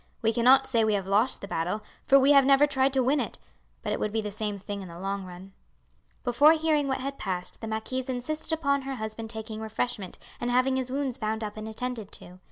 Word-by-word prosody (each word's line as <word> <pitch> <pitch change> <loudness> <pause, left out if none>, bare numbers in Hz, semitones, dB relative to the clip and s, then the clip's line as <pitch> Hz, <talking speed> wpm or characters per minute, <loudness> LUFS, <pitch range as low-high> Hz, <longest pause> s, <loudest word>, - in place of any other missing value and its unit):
We 225 0 +3
cannot 255 +3 +6
say 235 -4 +2
we 215 -1 +2
have 195 -2 -2
lost 210 +6 +2
the 200 - -6
battle, 180 +5 -2 0.2
for 275 - +7
we 275 +1 +5
have 275 -1 +7
never 275 +2 +6
tried 275 -2 +2
to 265 -1 +2
win 275 +4 +2
it; - - -3 0.5
but - - -1
it - - -2
would 210 - -1
be 225 - 0
the 210 -1 -5
same 210 -1 -3
thing 200 +1 -6
in 190 - -8
the 170 -1 -10
long 195 +1 -3
run." 185 +2 -11 0.7
Before 265 +6 +6
hearing 310 -3 +1
what 265 -1 -1
had 275 +1 -4
passed 180 -2 -4
the 225 - -5
marquise 245 +4 -3
insisted 305 +6 -3
upon 280 -3 +1
her 270 0 -4
husband 220 -1 -6
taking 220 -1 -6
refreshment 220 -3 -3 0.2
and 240 - -2
having 255 +2 +3
his 260 -1 -2
wounds 270 -1 -2
bound 220 0 -2
up 210 -1 -5
and 215 0 -6
attended 225 -1 -5
to. 180 +1 -7
235 Hz, 235 wpm, -27 LUFS, 210-270 Hz, 0.7 s, for